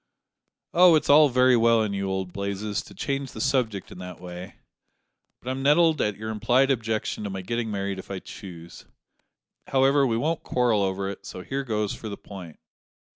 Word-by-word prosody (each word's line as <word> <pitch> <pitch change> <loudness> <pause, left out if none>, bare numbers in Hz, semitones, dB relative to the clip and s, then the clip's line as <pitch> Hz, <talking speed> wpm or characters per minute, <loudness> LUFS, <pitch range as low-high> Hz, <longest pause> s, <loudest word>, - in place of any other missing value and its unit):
"Oh! 175 -1 +7
it's 155 - +2
all 150 0 +7
very 125 0 +4
well 115 -1 +4
in 105 -2 -2
you, 100 -1 -2
old 95 -2 -3
Blazes, 100 +1 -3
to - - -14
change 135 -2 -3
the - - -8
subject 115 -6 -1
in - - -10
that 90 0 -8
way, 90 +1 -9 0.8
but 125 - -5
I'm 130 +1 -4
nettled 155 +3 +4
at 105 -2 -1
your 110 +1 -5
implied 125 +5 +2
objection 110 -4 -2
to 105 - -3
my 95 -1 -5
getting 115 +4 -3
married 100 -2 -3
if - - -11
I 100 - -4
choose. 85 -3 -11 0.8
However, 135 +1 +3
we 115 -2 0
won't 155 +6 -1
quarrel 120 -4 +1
over 95 0 -1
it, 100 - -7
so 90 - -7
here 135 +9 -3
goes 105 -5 -1
for 110 - -7
the 100 - -6
point." 90 -6 -11
110 Hz, 190 wpm, -25 LUFS, 100-135 Hz, 0.8 s, Oh